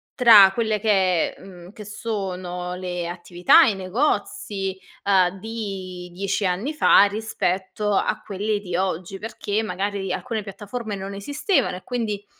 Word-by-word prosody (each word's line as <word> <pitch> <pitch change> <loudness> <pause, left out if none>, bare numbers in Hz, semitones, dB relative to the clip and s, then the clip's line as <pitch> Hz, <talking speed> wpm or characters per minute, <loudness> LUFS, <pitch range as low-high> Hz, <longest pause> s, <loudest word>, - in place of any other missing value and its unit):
tra 215 -6 +8
quelle 220 -1 0
che 190 -5 +2
è - - -20
mhmm, 180 -1 -12
che 210 -3 -10
sono 185 -4 -4
le 180 -1 -4
attività, 175 0 +4
i 220 - +1
negozi, 195 -2 -2 0.2
uhm, 190 -1 +2
di 195 -5 -6
10 195 +2 -2
anni 195 +12 -1
fa, 300 - +6
rispetto 205 -1 -1
a - - 0
quelle 205 +1 -2
di 180 -4 -5
oggi. 185 +1 -2
Perché 215 -1 -3
magari 200 -1 -3
alcune 225 -1 -3
piattaforme 205 +2 -6
non 195 +1 -6
esistevano 285 - 0
e - - -13
quindi, 215 -5 -3
195 Hz, 140 wpm, -23 LUFS, 185-215 Hz, 0.2 s, tra